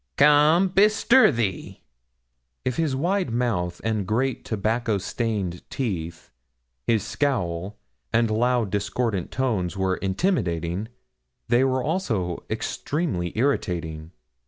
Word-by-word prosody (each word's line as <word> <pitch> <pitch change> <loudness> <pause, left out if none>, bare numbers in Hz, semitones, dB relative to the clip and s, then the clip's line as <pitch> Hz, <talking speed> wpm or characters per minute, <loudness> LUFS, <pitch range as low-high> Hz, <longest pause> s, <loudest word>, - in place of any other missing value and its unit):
Come, 150 +5 +5
bestir 215 +6 +5
thee!' 110 -7 -3 0.8
If 130 - -1
his 155 -5 +1
wide 180 +3 0
mouth 110 -8 -1
and 110 -4 -1
great 125 +4 0
tobacco 110 +1 0
stained 100 -3 -2
teeth, 85 -10 -4 0.6
his 110 -4 +2
scowl, 100 -8 -2 0.3
and 115 -1 +2
loud 120 -1 +1
discordant 105 -1 -1
tones 105 -9 -1
were 95 -1 0
intimidating, 95 - -1 0.6
they 120 +2 +4
were 130 -1 +1
also 110 - -1
extremely 140 - -2
irritating. 85 - -1
115 Hz, 105 wpm, -24 LUFS, 95-135 Hz, 0.8 s, Come